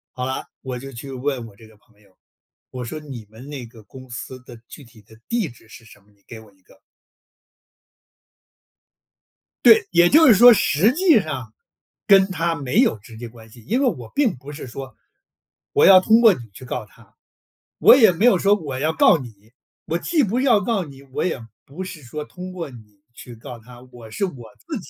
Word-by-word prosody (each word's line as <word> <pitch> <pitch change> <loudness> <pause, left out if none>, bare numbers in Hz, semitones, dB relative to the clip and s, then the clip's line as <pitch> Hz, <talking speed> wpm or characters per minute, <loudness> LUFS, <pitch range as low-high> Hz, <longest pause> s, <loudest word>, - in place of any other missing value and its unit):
好 125 0 -4
了， 130 - -4 0.2
我 130 -1 -6
就 135 +2 -9
去 135 +2 -9
问 130 -2 -4
我 105 - -17
这 110 +2 -17
个 110 - -21
朋 105 0 -31
友。 100 -3 -27 0.5
我 125 -1 -7
说 155 +7 -7
你 135 -7 -10
们 125 +6 -13
那 135 -5 -7
个 115 -1 -16
公 130 +5 -14
司 130 +2 -8
的 125 -1 -13
具 145 - -13
体 115 -3 -19
的 110 +1 -20
地 230 -8 -2
址 115 -1 -19
是 115 - -15
什 110 - -18
么？ 105 - -30
你 100 -1 -33
给 115 - -10
我 110 -2 -18
一 95 - -32
个。 - - -24 2.9
对， 225 -4 +6
也 175 0 +4
就 315 +2 +6
是 230 - +7
说 240 +4 +8
实 200 +2 +2
际 320 - +3
上 130 - -7 0.5
跟 195 -2 +5
他 170 -2 -1
没 140 -6 0
有 110 - +1
直 110 +2 -15
接 120 0 -8
关 115 -1 -16
系。 115 +2 -16
因 245 +6 -1
为 - - +2
我 125 - -4
并 265 -9 +1
不 135 +3 -12
是 145 -3 -9
说， 130 +2 -9 0.8
我 435 - +3
要 185 -1 +8
通 220 +3 +4
过 225 -3 +6
你 - - -8
去 130 - -12
告 125 -2 -5
他， 100 - -23 0.6
我 - - +8
也 225 -7 +5
没 185 +6 -3
有 225 -7 +5
说 200 +3 +3
我 145 -9 -6
要 155 +3 -1
告 160 - +4
你。 130 -5 -9 0.6
我 165 - -1
既 305 - 0
不 225 +4 -1
要 250 -6 +3
告 200 -2 -2
你， 140 -2 -14
我 135 +3 -4
也 180 - -2 0.3
不 155 +8 -8
是 175 -5 -9
说 150 +4 -7
通 185 +2 -10
过 170 -5 -6
你 105 -5 -17
去 120 0 -12
告 120 +1 -11
他， 120 +2 -16
我 120 -3 -13
是 155 - -5
我 130 - -5 0.2
自 310 -7 -5
己 180 - -14
135 Hz, 230 characters per minute, -21 LUFS, 120-190 Hz, 2.9 s, 说